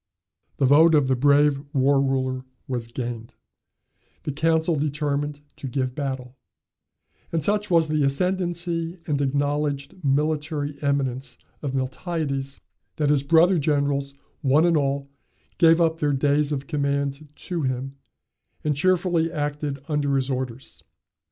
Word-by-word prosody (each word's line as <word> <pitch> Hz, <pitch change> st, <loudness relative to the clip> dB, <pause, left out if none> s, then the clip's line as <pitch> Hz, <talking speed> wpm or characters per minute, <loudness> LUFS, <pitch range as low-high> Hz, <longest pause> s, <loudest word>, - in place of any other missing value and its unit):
The 135 Hz, -, +2 dB
vote 155 Hz, +4 st, +6 dB
of 145 Hz, -3 st, +3 dB
the 130 Hz, -, +2 dB
brave 140 Hz, +1 st, +4 dB
War 135 Hz, 0 st, +3 dB
ruler 130 Hz, -1 st, -1 dB, 0.2 s
was 120 Hz, -4 st, -3 dB
gained, 115 Hz, -1 st, -6 dB, 0.9 s
the 150 Hz, -, -2 dB
council 160 Hz, +3 st, +1 dB
determined 145 Hz, 0 st, -2 dB, 0.2 s
to 150 Hz, -3 st, -6 dB
give 130 Hz, 0 st, -2 dB
battle; 130 Hz, -2 st, -5 dB, 0.9 s
and 165 Hz, -2 st, -1 dB
such 210 Hz, +4 st, +1 dB
was 165 Hz, -3 st, +4 dB
the 155 Hz, -1 st, 0 dB
ascendancy 170 Hz, +2 st, -1 dB
and 145 Hz, -2 st, 0 dB
acknowledged 145 Hz, +3 st, -1 dB
military 150 Hz, +1 st, 0 dB
eminence 135 Hz, -3 st, -1 dB, 0.2 s
of 140 Hz, -3 st, -3 dB
Miltiades, 135 Hz, 0 st, -3 dB, 0.4 s
that 150 Hz, -2 st, +1 dB
his 145 Hz, -2 st, +3 dB
brother 165 Hz, +5 st, +4 dB
generals 140 Hz, -2 st, 0 dB, 0.3 s
one 145 Hz, +4 st, +4 dB
and 170 Hz, -1 st, +3 dB
all 140 Hz, -1 st, 0 dB, 0.5 s
gave 165 Hz, 0 st, +6 dB
up 165 Hz, -1 st, +2 dB
their 145 Hz, -1 st, +1 dB
days 145 Hz, +2 st, +2 dB
of 140 Hz, -1 st, -2 dB
command 140 Hz, -1 st, -2 dB
to 175 Hz, -3 st, -4 dB
him, 135 Hz, 0 st, -3 dB, 0.7 s
and 150 Hz, -1 st, +1 dB
cheerfully 175 Hz, 0 st, +2 dB
acted 145 Hz, -2 st, -3 dB
under 145 Hz, -3 st, 0 dB
his 135 Hz, 0 st, 0 dB
orders. 130 Hz, -1 st, -5 dB
145 Hz, 130 wpm, -24 LUFS, 135-155 Hz, 0.9 s, vote